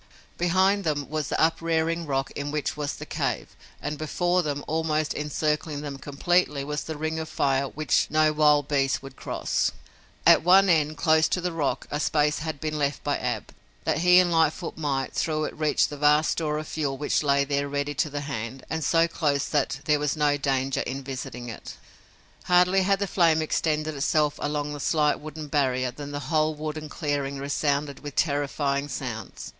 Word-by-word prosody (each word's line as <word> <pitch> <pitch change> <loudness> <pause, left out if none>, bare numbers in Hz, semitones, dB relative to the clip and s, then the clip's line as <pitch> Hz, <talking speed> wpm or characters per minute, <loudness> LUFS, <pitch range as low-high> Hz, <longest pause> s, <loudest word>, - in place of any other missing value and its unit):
Behind 190 +3 +3
them 145 -4 -1
was 155 -2 -1
the - - -2
uprearing 165 0 +1
rock 135 -1 -1
in 145 0 -4
which 150 0 -2
was 150 -1 -3
the - - -8
cave - - -3 0.2
and 150 0 -4
before 175 +4 +1
them, 145 -3 -3
almost 155 -1 0
encircling 150 0 -2
them 140 -2 -6
completely, 145 +1 0
was 150 0 -4
the 160 -2 -5
ring 155 +1 -2
of 160 0 -5
fire 140 -3 +1
which 155 +2 +1
no 155 0 +3
wild 150 -2 +4
beast 135 -2 +1
would 135 -1 -10
cross. - - -1 0.5
At - - +7
one 190 +3 +6
end, 155 -2 +2
close 155 +1 +4
to - - 0
the 180 0 -2
rock, 145 -6 -1
a 145 - -1
space 150 -1 +1
had 155 -2 -4
been 155 0 -3
left 140 -1 -1
by - - 0
Ab, - - -3 0.3
that - - 0
he 180 +1 +6
and 180 -1 +5
Lightfoot 165 +1 +1
might, 140 -4 -2
through 155 -1 0
it, - - -3
reach 155 -1 +2
the 145 - -8
vast 150 +1 +4
store 150 -2 -1
of 155 - -5
fuel 140 -4 -2
which 145 - 0
lay 140 -2 +3
there 140 0 -1
ready 145 +1 -2
to 150 - 0
the 145 0 -4
hand 130 -2 -5
and 160 -1 -2
so 165 +2 +3
close 145 -4 0
that 135 -2 -1
there 150 -1 +3
was 150 +1 -1
no 145 -1 +3
danger 135 -1 0
in 135 +2 -4
visiting 125 -2 -6
it. 115 - -8 0.7
Hardly 180 +2 +4
had 195 +1 +2
the 200 - -1
flame 170 -4 +3
extended 155 0 0
itself 150 +1 +1
along 150 0 -2
the 145 - -6
slight 150 0 +2
wooden 155 0 -7
barrier 130 -3 +1
than 145 +3 -8
the 145 0 -4
whole 155 0 +2
wood 155 0 -4
and 155 -1 -7
clearing 145 -2 -2
resounded 140 0 -1
with 145 -1 -8
terrifying 140 -1 0
sounds. 120 -8 -6
150 Hz, 195 wpm, -26 LUFS, 140-160 Hz, 0.7 s, At